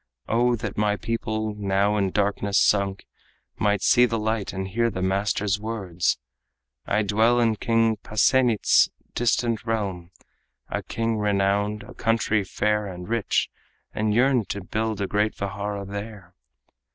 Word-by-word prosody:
O 120 +2 +2
that 105 -3 -5
my 105 -1 +2
people, 110 -1 -3
now 100 0 +1
in 100 -2 +1
darkness 100 0 0
sunk, 100 -1 +1 0.5
Might 105 -2 +1
see 125 -1 +5
the 115 0 -1
light 110 -1 -1
and 95 0 -4
hear 115 +5 +1
the 95 -4 -4
master's 100 +1 0
words! 100 -6 -1 0.7
I 105 +1 +1
dwell 110 +4 +3
in 115 -2 +2
King 115 -1 +2
Pasenit's 110 +2 +3 0.2
distant 120 -1 0
realm 100 -6 -3 0.6
A - - -2
king 115 -1 -2
renowned, 100 +1 0
a - - -12
country 110 -2 +1
fair 105 +2 -1
and 90 -1 -8
rich 115 -1 0 0.4
And 105 0 0
yearn 125 0 +3
to 100 0 -5
build 110 +1 -2
a - - +1
great 105 +2 0
vihara 100 +1 -4
there." 100 -2 -8
105 Hz, 140 wpm, -24 LUFS, 100-115 Hz, 0.7 s, see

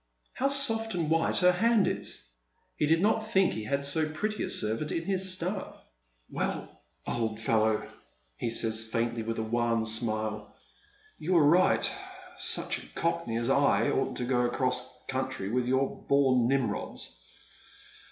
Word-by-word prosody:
How 270 - 0
soft 225 -7 0
and 165 -3 -1
wliite 165 +3 +2
her 180 0 +6
hand 225 +3 +3
is! - - -3 0.5
He 150 - +1
did 165 +3 +3
not 220 +1 +1
think 195 -4 +3
he 110 - -5
had 140 +5 -1
so 155 +2 0
pretty 210 +7 -3
a - - -3
servant 110 +8 -1
in 165 - -2
his 190 -1 0
staff. 185 +2 -3 0.3
" - - -43
Well, - - -4 0.2
old 110 -2 -2
fellow," 110 -1 +1 0.5
he 115 - -3
says 110 -1 +2
faintly, 115 +1 -1
and 110 - -5
with 115 - -2
a 110 - -1
wan 115 0 0
smile, 110 -1 -1 0.3
" 420 +1 -32
you 180 +4 -1
were 165 -4 +5
right. 175 +5 +4 0.5
Such - - -1
a - - -14
cockney 120 -8 -1
as 120 +3 0
I 135 -6 +3
oughtn't 135 - -1
to 125 - -2
go 125 0 +1
across 125 +1 -1 0.2
country 130 -7 -2
with 125 0 0
your 130 +1 0
bom 130 -4 +4
Nimrods. 135 -1 -2
135 Hz, 165 wpm, -29 LUFS, 115-180 Hz, 0.5 s, her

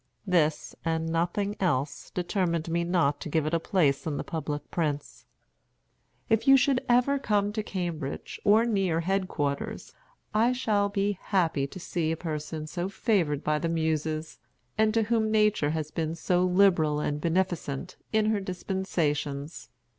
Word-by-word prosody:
This, 165 -5 +1
and 160 0 0
nothing 175 +5 0
else, 145 -6 -1
determined 175 -3 -1
me 170 +1 +1
not 170 -5 +1
to - - -5
give 155 0 +1
it 155 - -2
a 165 - +3
place 160 -5 +1
in 145 -2 -2
the - - -3
public 150 -3 -4
prints. 150 -4 -3 1.0
"If 225 +1 +1
you 270 0 +9
should 265 0 +2
ever 250 +4 +3
come 205 -4 +1
to 215 - -1
Cambridge, 170 -8 -4
or 215 +3 +5
near 190 -7 +1
head 190 +2 0
quarters, 140 -4 -3 0.4
I 230 +4 +3
shall 210 -5 +1
be 200 -1 -1
happy 165 -8 +1
to 185 - -10
see 165 -2 -1
a 165 - -2
person 155 -1 -4
so 175 +4 -3
favored 185 - 0
by 150 0 +1
the 165 - -1
Muses, 160 -1 -1 0.4
and 220 0 +3
to 225 - +4
whom 220 0 +1
Nature 210 -8 +3
had 155 -1 -3
been 160 -1 -2
so 180 +2 +1
liberal 180 -5 +3
and 150 0 -2
beneficent 175 -2 -1 0.2
in 215 0 +2
her 215 - +1
dispensations. 165 -6 -2
175 Hz, 160 wpm, -28 LUFS, 155-200 Hz, 1.0 s, you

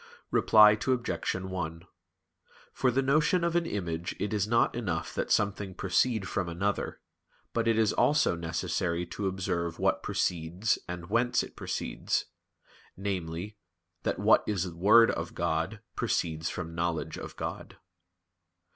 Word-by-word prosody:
Reply 105 -1 +7
Obj. 120 +3 -1
1: 90 -3 -4 0.9
For 130 - +2
the 130 +3 +1
notion 155 +6 +3
of 170 0 0
an 170 -1 +2
image 85 - -3
it 105 +2 -2
is 105 -1 +1
not 115 +1 +3
enough 95 -9 -3
that - - -2
something 100 -2 0
proceed 100 +3 +1
from 95 -4 -2
another, 100 +5 -2 0.5
but 115 -1 0
it 115 -1 +3
is 110 -2 +3
also 150 - +3
necessary 85 +1 -2
to 100 +3 -4
observe 90 -3 -2
what - - +1
proceeds 90 +5 0
and 90 +1 -7
whence 120 +2 +2
it - - -10
proceeds; - - -2 0.7
namely, 95 0 -4 0.4
that - - -1
what - - +5
is 95 -3 0
Word 105 +7 +6
of - - -5
God - - -1
proceeds 80 0 -1
from 85 +1 -5
knowledge 85 -1 -2
of - - -8
God. - - -6
95 Hz, 140 wpm, -29 LUFS, 85-110 Hz, 0.9 s, Reply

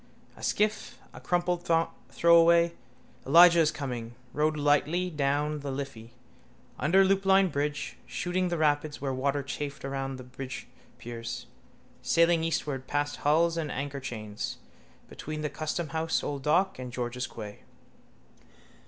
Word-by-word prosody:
A - - -14
skiff, 215 +1 0 0.2
a - - -11
crumpled 175 0 -1 0.4
throwaway, 170 0 +5 0.5
Elijah 170 +3 +8
is 160 -2 +4
coming, 120 -4 -5 0.2
rode 155 +1 +1
lightly 150 +5 +2
down 150 0 0
the 140 0 -5
Liffey, 130 -4 -6 0.6
under 185 +7 +4
Loopline 195 -1 +4
bridge, 145 +1 -2
shooting 180 +1 -1
the 175 -1 -1
rapids 150 -1 +1
where 135 -2 -2
water 140 +2 0
chafed 140 0 -5
around 135 0 -3
the 130 - -9
bridgepiers, 125 -2 -8 0.6
sailing 170 0 +3
eastward 145 -5 -2
past 145 0 -1
hulls 165 +3 +2
and 155 -2 -2
anchorchains, 130 -7 -5 0.5
between 155 0 -6
the 150 -2 -2
Customhouse 160 +1 -2
old 140 -1 -3
dock 175 +4 +2
and 125 -1 -6
George's 125 +1 -3
quay. 105 -3 -9
145 Hz, 125 wpm, -28 LUFS, 135-170 Hz, 0.6 s, Elijah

